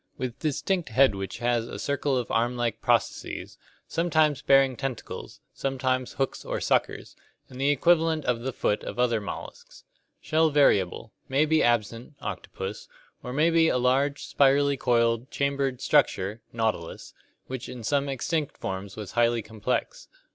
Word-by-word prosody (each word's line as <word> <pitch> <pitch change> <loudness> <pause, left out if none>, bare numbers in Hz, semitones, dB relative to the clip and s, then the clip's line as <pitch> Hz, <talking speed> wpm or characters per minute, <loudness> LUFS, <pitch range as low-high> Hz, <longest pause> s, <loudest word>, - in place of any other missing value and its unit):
With 125 -3 -4
distinct 165 - -1
head 130 +1 +4
which 95 0 -5
has 120 -1 0
a - - -7
circle 140 -1 -1
of 125 - -3
arm 120 +2 +1
like 120 -1 -2
processes, - - -1 0.3
sometimes 155 -4 +1
bearing 135 -2 +4
tentacles, 135 -2 -6
sometimes 130 -1 -1
hooks 135 -1 -2
or - - -3
suckers, - - -1 0.3
and 130 0 -8
the 140 - +3
equivalent 160 +1 +3
of 125 -2 +1
the 130 +3 -3
foot 105 -3 -1
of - - -6
other 120 -3 +2
molluscs. 480 - -9 0.4
Shell 160 0 +2
variable; 115 -7 +2 0.2
may 135 +3 +3
be 160 0 +3
absent 120 +3 0
(octopus), 95 0 -6 0.3
or 125 - -6
may 155 +6 +3
be 165 -1 +4
a 125 - +2
large, 135 +3 +1
spirally 140 0 +3
coiled, 115 -1 +1
chambered 140 -2 -1
structure 110 -7 +2
(nautilus) 110 -7 -3 0.3
which 130 -1 -6
in 120 -2 -8
some 140 +4 0
extinct 145 +3 -2
forms 95 0 -5
was 105 -3 -7
highly 120 -1 +2
complex. 110 - -3
130 Hz, 150 wpm, -26 LUFS, 115-145 Hz, 0.4 s, head